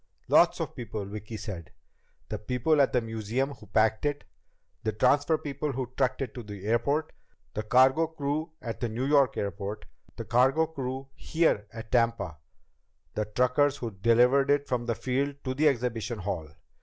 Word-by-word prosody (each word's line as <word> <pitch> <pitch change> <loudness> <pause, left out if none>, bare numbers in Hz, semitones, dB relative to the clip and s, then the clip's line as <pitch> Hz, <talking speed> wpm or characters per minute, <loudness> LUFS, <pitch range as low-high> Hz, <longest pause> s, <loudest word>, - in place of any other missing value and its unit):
"Lots - - +5
of - - -4
people," 110 -4 -5
Vicki 105 +2 -7
said. 95 -6 -7 0.6
"The - - -3
people 130 +6 +2
at 135 - +3
the 125 - +2
museum 115 +4 -2
who - - -15
packed 110 0 +2
it. 145 -1 -1 0.6
The 110 - -1
transfer 145 +7 +3
people 145 0 -3
who 130 -1 -4
trucked 130 0 +1
it 125 - -6
to 125 - -6
the 100 -3 -9
airport. 140 +8 +1 0.4
The 110 - -2
cargo 130 +8 +4
crew 155 +1 -3
at 115 -2 -4
the 120 - -1
New 120 +4 -2
York 140 -3 +3
airport. 100 +1 -4 0.3
The - - -6
cargo 130 +6 +3
crew 135 -3 -5
here 160 -11 +1
at 115 0 -9
Tampa. 115 -9 +1 0.8
The 105 - -1
truckers 125 +6 +2
who 115 -4 -4
delivered 120 +7 +4
it 145 0 +2
from 120 -2 -1
the 115 - 0
field 135 +4 -1
to 130 - -2
the 150 +4 +3
exhibition 120 -3 0
hall. 95 -6 -4
125 Hz, 170 wpm, -28 LUFS, 110-140 Hz, 0.8 s, Lots